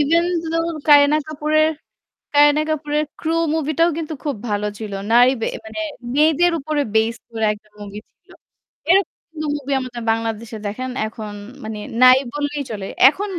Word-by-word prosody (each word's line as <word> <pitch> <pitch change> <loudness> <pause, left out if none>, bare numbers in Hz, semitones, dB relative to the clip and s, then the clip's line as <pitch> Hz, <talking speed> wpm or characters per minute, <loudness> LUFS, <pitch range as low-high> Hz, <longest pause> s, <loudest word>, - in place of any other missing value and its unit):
Even 330 +4 +3 0.3
though 330 0 0 0.2
Kareena 290 0 +7
Kapoor 305 0 -4
এর 315 - +2 0.6
Kareena 295 +1 +5
Kapoor 300 -1 -3
এর 305 - 0
Crew 330 +1 0
movie 310 -1 -1
টাও 335 +1 +5
কিন্তু 320 -1 -4
খুব 290 -2 -2
ভালো 210 0 -1
ছিল। 215 -2 -6 0.2
নারী 245 +2 +6
বে - - 0 0.2
মানে 220 +8 -7 0.4
মেয়েদের 320 +3 +4
উপরে 295 +1 -1
based 225 +1 +1
করে 220 -1 -1
একটা 210 0 -17
movie 205 0 -8
ছিল। - - -42 0.6
এরকম 390 +2 +3 0.2
কিন্তু 310 -1 -5
movie 280 -1 -3
আমাদের 245 -2 -6
বাংলাদেশে 225 0 -3
দেখেন 255 +6 -4 0.2
এখন 215 -1 -7 0.3
মানে 215 -1 -5 0.2
নাই 255 +1 +9
বলেই 290 0 -2
চলে। 200 -3 -5 0.2
এখন 395 +8 -3
285 Hz, 165 wpm, -20 LUFS, 225-310 Hz, 0.6 s, নাই